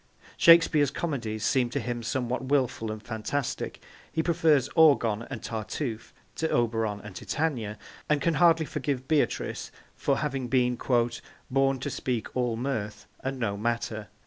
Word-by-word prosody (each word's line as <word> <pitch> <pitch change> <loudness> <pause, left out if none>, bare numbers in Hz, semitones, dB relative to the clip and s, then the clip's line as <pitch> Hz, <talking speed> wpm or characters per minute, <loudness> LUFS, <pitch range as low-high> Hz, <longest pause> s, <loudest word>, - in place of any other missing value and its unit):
Shakespeare's 165 -4 +6
comedies 115 -11 -3
seem 125 -3 +2
to - - -2
him 120 -1 -3
somewhat 125 +1 -2
wilful 130 -5 0
and 110 0 -7
fantastic; 120 +4 -3 0.3
he 160 - 0
prefers 160 -6 +3
Orgon 120 -9 +4
and 120 -5 -6
Tartuffe 110 +2 -4 0.3
to 160 - 0
Oberon 115 -3 0
and 105 -3 -10
Titania, 120 -9 -2 0.3
and 150 -1 +3
can 165 +4 +1
hardly 165 -1 +4
forgive 130 -3 -3
Beatrice 155 -1 0 0.2
for 140 - 0
having 135 -3 -2
been 125 -1 +2
'born 130 +3 0
to 140 - -3
speak 120 -5 -3
all 125 -2 0
mirth, 115 -5 -3
and 135 0 -3
no 110 -5 -1
matter.' 110 -1 -2
125 Hz, 145 wpm, -28 LUFS, 115-145 Hz, 0.3 s, Shakespeare's